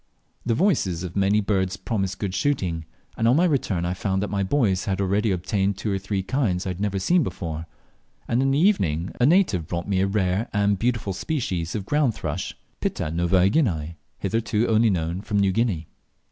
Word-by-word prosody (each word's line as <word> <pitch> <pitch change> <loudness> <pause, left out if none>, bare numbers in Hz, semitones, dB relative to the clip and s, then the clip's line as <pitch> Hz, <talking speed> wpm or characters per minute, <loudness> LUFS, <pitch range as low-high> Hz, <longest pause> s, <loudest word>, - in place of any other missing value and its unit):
The 115 - +2
voices 110 - +1
of 90 -2 -6
many 100 +2 +3
birds 95 -2 0
promised 95 -4 -2
good 100 -3 -3
shooting, 90 - -1 0.3
and 115 - +1
on 120 - +5
my 170 +4 +4
return 110 - 0
I 90 - -1
found 95 +1 -1
that 105 - -4
my 100 -1 0
boys 100 -3 +1
had 95 -1 -1
already 100 +3 +1
obtained 95 +1 0
two 105 +1 -2
or 95 - 0
three 100 0 -2
kinds 100 -7 0
I 95 - -1
had 90 - -7
not 100 -1 -1
seen 175 - +3
before; 85 - -4 0.6
and 120 - +1
in 135 - +2
the 135 - +2
evening 95 - +2
a 125 - +6
native 150 - +3
brought 85 0 -3
me 100 -2 +1
a 95 - +2
rare 95 +2 0
and 100 -1 +2
beautiful 115 -5 0
species 95 - -2
of 100 -3 -3
ground 145 -3 +1
thrush 80 +4 -4 0.2
(Pitta 75 - -2
novaeguinaeae) 90 - +2 0.2
hitherto 110 +2 0
only 110 +1 +4
known 85 -1 -1
from 105 0 -2
New 100 -1 +3
Guinea. 95 -7 0
100 Hz, 195 wpm, -24 LUFS, 90-115 Hz, 0.6 s, a